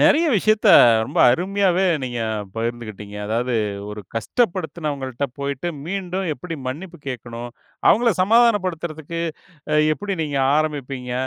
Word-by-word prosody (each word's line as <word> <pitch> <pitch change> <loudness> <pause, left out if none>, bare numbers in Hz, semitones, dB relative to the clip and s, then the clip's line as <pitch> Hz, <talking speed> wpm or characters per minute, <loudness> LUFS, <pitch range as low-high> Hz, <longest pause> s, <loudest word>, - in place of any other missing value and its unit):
நெறய 325 +3 +5
விஷயத்த 215 +2 +3 0.4
ரொம்ப - - -4
அருமையாவே 190 +5 +1 0.2
நீங்கப் 110 -5 -3
பகிர்ந்துக்கிட்டீங்க. 110 -3 -5
அதாவது 120 +3 -1 0.4
ஒரு 105 - -6
கஷ்டப்படுத்தினவங்கள்ட்ட 150 - -2
போயிட்டு 140 +3 -3 0.2
மீண்டும் 190 0 -3
எப்டி 165 +4 -7
மன்னிப்பு 170 +6 -6
கேக்கணும், 120 -1 -6 0.4
அவங்கள 235 +2 +5
சமாதானப்படுத்துறதுக்கு 185 -8 +1 0.6
அ - - +4 0.2
எப்டி 200 +3 -4
நீங்க 145 -3 -2 0.2
ஆரம்பிப்பீங்க. 135 -5 -2
155 Hz, 105 wpm, -21 LUFS, 120-190 Hz, 0.6 s, நெறய